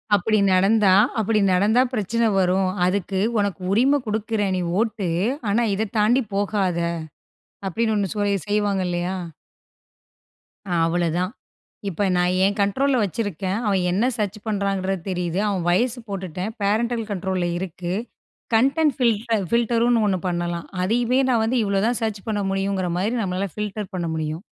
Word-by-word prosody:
அப்படி 215 +3 +1 0.2
நடந்தா 195 +1 +4 0.3
அப்படி 220 0 +2
நடந்தா 210 +7 +4
பிரச்சன 230 +1 0 0.2
வரும். 185 +1 +2 0.2
அதுக்கு 190 0 -1 0.2
உனக்கு 200 -4 -1
உரிமை 260 +8 +4
கொடுக்கிறேன் 215 -2 -1
நீ 180 - -1 0.2
ஓட்டு, 220 -4 -1 0.4
ஆனா 230 +4 +2
இத 215 +1 -1
தாண்டி 240 +5 +4
போகாத 200 -4 0 0.9
அப்படின்னு 220 +4 0
ஒண்ணு 200 -2 0
சொல் 205 -1 +1
செய்வாங்க 205 -2 +1
இல்லையா? 175 +1 -2 1.5
ஆ 175 - -1
அவ்வளோதான், 175 +2 0 0.6
இப்போ 195 +2 -1
நான் 180 0 +2
என் 200 +2 +1
கண்ட்ரோலில 260 +6 +2
வச்சிருக்கேன், 200 -1 -2
அவன் 195 -2 +2
என்ன 205 +6 +1
சர்ச் 210 0 -2
பண்ணுறாங்க 195 -2 -1 0.2
தெரியுது, 180 0 -1
அவன் 185 -4 -1
வயசு 240 +7 +1
போட்டுட்டேன், 190 +1 -4
பேரன்டல் 225 +3 +1
கண்ட்ரோலில 185 -2 -1
இருக்கு, 180 -1 -5 0.6
கன்டென்ட் 275 +4 +3
ஃபில் 235 -5 +3 0.3
ஃபில்டர்ன்னு 235 0 +2
ஒண்ணு 190 -2 +1
பண்ணலாம், 175 -1 -2 0.2
அதையுமே 240 +6 +2
நான் 230 -3 +3
வந்து 245 +3 0
இவ்வளோ 200 -1 +1
தான் 240 0 0
சர்ச் 215 -3 -2
பண்ண 205 -1 0
முடியுங்கிற 195 -1 -1
மாதிரி 215 +6 0
நம்மளால 185 +1 -2
ஃபில்டர் 210 -1 -4
பண்ண 175 -2 -2
முடியும். 155 +3 -3
200 Hz, 140 wpm, -23 LUFS, 185-220 Hz, 1.5 s, நடந்தா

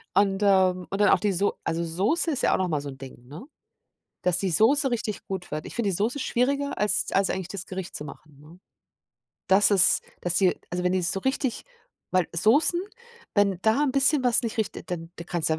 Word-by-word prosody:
Und, 195 -1 +2
ähm, 185 -2 +2
und 195 - -4
dann 205 - +5
auch - - +4
die 205 +2 0
So 195 +3 0
also, 165 +1 -2
Soße 200 - 0
ist 275 - -2
ja - - +3
auch - - +2
noch 185 - -1
mal 150 -3 -1
so 145 - -7
'n 135 - -10
Ding, 130 -2 -12
ne, 150 - -10 0.8
dass 180 -2 +2
die 190 0 -1
Soße 265 - +3
richtig 220 -3 -3
gut 190 -2 -6
wird. 155 0 -4
Ich - - -9
finde 235 -4 -1
die 185 - -1
Soße 225 +8 -1
schwieriger, 280 +2 -1
als 210 -1 +1
als 195 0 +2
eigentlich 190 -2 -4
das 195 -2 -6
Gericht 190 -1 -6
zu 150 - -7
machen, 150 -1 -13
ne? 160 +4 -16 0.9
Dass 195 +2 +4
es 195 -3 +5 0.2
dass 175 0 +1
sie 185 -2 +3
also, 180 0 -3
wenn 180 - +1
die 185 0 0
so 190 +2 +1
richtig 265 -2 -2 0.5
weil 185 -2 +1
Soßen, 285 - +3 0.5
wenn 200 -3 +2
da 220 +7 +2
'n 285 - +1
bisschen 275 +1 +3
was 245 -2 +3
nicht 230 -2 -4
richt 220 -2 -2 0.2
dann 165 -1 -5
da 170 - -8
kannst 170 -2 -2
du - - +2
die - - 0
195 Hz, 230 wpm, -25 LUFS, 175-225 Hz, 0.9 s, dann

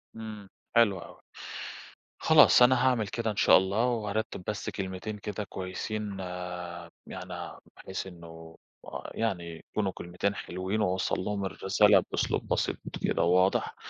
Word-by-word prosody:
إمم، 110 -3 -8 0.3
حلو 110 -5 +5
أوي، - - -12 1.0
خلاص - - +7
أنا 130 +1 +5
هاعمل 120 -5 +2
كده 115 +2 -2
إن 105 - -5
شاء - - +7
الله 100 +6 +1
وهارتّب 110 -4 -2
بس 105 -2 -3
كلمتين 95 +3 -5
كده 105 +1 -4
كويسين 100 +2 -4 0.9
يعني - - -7 0.2
بحيث 95 0 -5
إنه 80 -2 -11 0.6
يعني 85 -7 -3
يكونوا 100 -3 0
كلمتين 90 +4 -2
حلوين 95 +2 -3
و 105 - +2
أوصّل 95 0 0
لهم 100 +1 -2
الرسالة 95 0 +4
بأسلوب - - -1
بسيط - - 0 0.3
كده - - +1
وواضح. 90 +2 +3
100 Hz, 130 wpm, -29 LUFS, 95-110 Hz, 1.0 s, خلاص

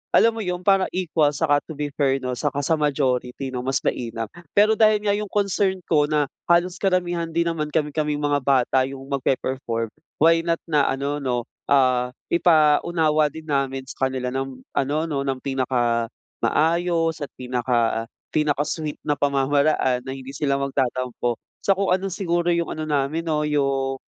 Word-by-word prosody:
alam 230 - +6
mo 225 - -6
'yung 180 -2 -3
para 195 0 +4
equal 160 -5 +2
saka 145 -1 +2
to 160 - -7
be 145 0 -3
fair, 135 -1 +3
'no, 125 - -2
saka 145 +2 -2
sa 165 - +2
majority, 135 -3 -1
'no, 125 - -2
mas 135 +1 -1
mainam. 115 -2 -2 0.3
Pero 210 +2 +5
dahil 215 -1 +4
nga 205 - +3
'yung 210 0 -3
concern 195 -1 +1
ko 150 -3 +3
na 150 -1 +2 0.2
halos 175 +1 +3
karamihan 175 -3 0
din 170 +1 0
naman 155 -2 -2
kami-kaming 150 0 -1
mga 145 0 +2
bata 130 -1 +2
'yung 135 0 -8
magpe-perform, 130 -4 -1 0.3
why 165 +2 +5
not 165 0 0
na 150 -4 +2
ano, 140 +2 -2
'no, 125 -3 -1 0.3
ah, 130 -3 +3 0.2
ipaunawa 155 -1 +3
din 160 +2 -10
namin 135 -3 -1
sa 130 0 -1
kanila 130 -1 -3
ng 135 -1 -4
ano, 140 +2 0
'no, 145 -4 -2
ng 135 -1 0
pinakamaayos 140 +7 0
at 145 - -4
pinaka 120 -2 0 0.3
pinaka-sweet 150 0 -1
na 145 - +2
pamamaraan 140 -2 +1
na 130 - -6
hindi 135 +1 -8
sila 140 -1 0
magtatampo. 130 -3 -1 0.2
So - - +3
kung 195 -1 +2
ano 190 0 -4
siguro 175 -2 0
'yung 170 -1 +1
ano 155 - -4
namin 150 +2 -1
'no, 150 -2 0
'yung 135 -2 0
145 Hz, 165 wpm, -23 LUFS, 135-165 Hz, 0.3 s, alam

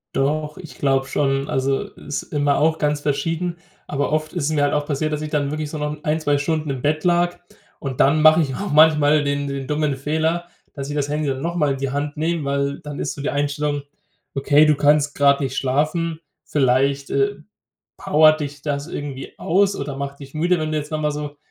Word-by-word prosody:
Doch, 150 +2 0
ich 170 -4 -11
glaube 135 -1 +2
schon. 135 0 0
Also, 135 +1 0
ist 145 - -5
immer 145 -1 0
auch 160 +2 +2
ganz 150 -1 0
verschieden, 165 +4 -1 0.3
aber 145 0 -2
oft 155 0 -1
ist 140 - -1
es - - +1
mir 145 -2 +2
halt 145 - +2
auch 150 0 0
passiert, 155 +1 -1
dass 150 - -2
ich 155 - -4
dann 145 -2 0
wirklich 155 -1 -3
so 155 - -5
noch 150 0 -4
1, 155 +1 +1
2 145 -2 +1
Stunden 155 0 -1
im 130 -2 -4
Bett 155 +1 0
lag. 175 0 +2 0.4
Und 135 -3 -5
dann 150 +3 +4
mache 155 +1 +7
ich 135 -4 -2
auch 200 -4 -4
manchmal 150 -1 +5
den 140 0 -1
den 140 -1 -4
dummen 150 -2 0
Fehler, 160 +5 -1 0.3
dass 140 -1 -6
ich 145 - -4
das 145 -1 -1
Handy 150 0 -1
dann 135 0 -2
nochmal 165 -4 0
in - - -5
die 135 -1 -2
Hand 145 +1 -3
nehme, 165 0 -1
weil 140 0 -1
dann 145 -1 -7
ist - - -2
so 140 - -8
die 145 - -1
Einstellung: 145 0 -1 0.5
„Okay, 145 +2 +4
du 150 - +4
kannst 145 0 +3
grad 140 0 +4
nicht 135 -1 -2
schlafen 155 +5 0 0.2
vielleicht, 135 0 +1
äh, 135 0 +1 0.6
powert 155 +1 +4
dich 145 0 -6
das 145 0 -2
irgendwie 140 -4 -6
aus 200 +3 +2
oder 140 -2 -4
macht 140 0 -5
dich 135 0 -11
müde, 175 +3 +2
wenn 155 0 -2
du 155 - 0
jetzt 150 +1 -7
nochmal 155 -1 0
so 145 0 -6
145 Hz, 220 wpm, -21 LUFS, 140-155 Hz, 0.6 s, mache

